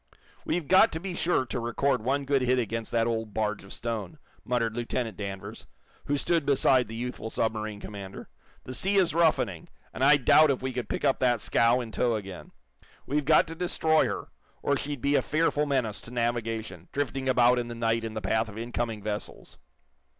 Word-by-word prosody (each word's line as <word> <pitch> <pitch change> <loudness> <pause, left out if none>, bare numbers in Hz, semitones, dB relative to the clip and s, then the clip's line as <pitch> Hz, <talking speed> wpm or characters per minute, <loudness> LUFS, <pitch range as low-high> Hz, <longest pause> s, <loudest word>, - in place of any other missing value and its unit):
"We've 170 -4 -1
got 190 +4 +6
to 160 - -3
be 185 +1 -5
sure 170 -7 +1
to 120 - -4
record 120 +3 0
one 140 +3 0
good 140 -1 +2
hit 125 0 +2
against 115 -1 -2
that 115 -1 +2
old 110 -3 -3
barge 105 -2 -1
of 95 - -13
stone," 115 +5 -4 0.3
muttered 115 -3 -1
Lieutenant 120 -2 -2
Danvers, 100 -1 -7 0.4
who 145 - 0
stood 165 +2 +1
beside 135 -3 +3
the 110 - -8
youthful 120 -2 -5
submarine 110 -2 -2
commander. 100 -2 -8 0.4
"The 130 - -7
sea 195 +9 +1
is 185 -5 +3
roughening, 155 - +1 0.2
and - - -3
I 145 - +7
doubt 155 +3 +5
if 130 -2 -1
we 130 -1 -2
could 120 -3 -4
pick - - -2
up 135 - +2
that 120 -2 +2
scow 115 +3 +3
in 115 -2 -7
tow 120 0 +1
again. 95 -4 -7 0.6
We've 145 +1 -1
got 155 +1 +5
to - - -5
destroy 160 -2 +2
her, - - -5 0.3
or 140 - +2
she'd 140 -2 -4
be 140 +3 +1
a - - +4
fearful 150 -1 +1
menace 125 -7 0
to 115 - -9
navigation, 115 -2 -3
drifting 135 -1 -2
about 125 -1 +4
in 120 - -3
the 120 - -6
night 115 0 0
in 110 -1 -5
the 110 - -3
path 110 +3 0
of 105 - -10
incoming 115 -2 -3
vessels." 105 -1 -6
120 Hz, 200 wpm, -27 LUFS, 110-140 Hz, 0.6 s, I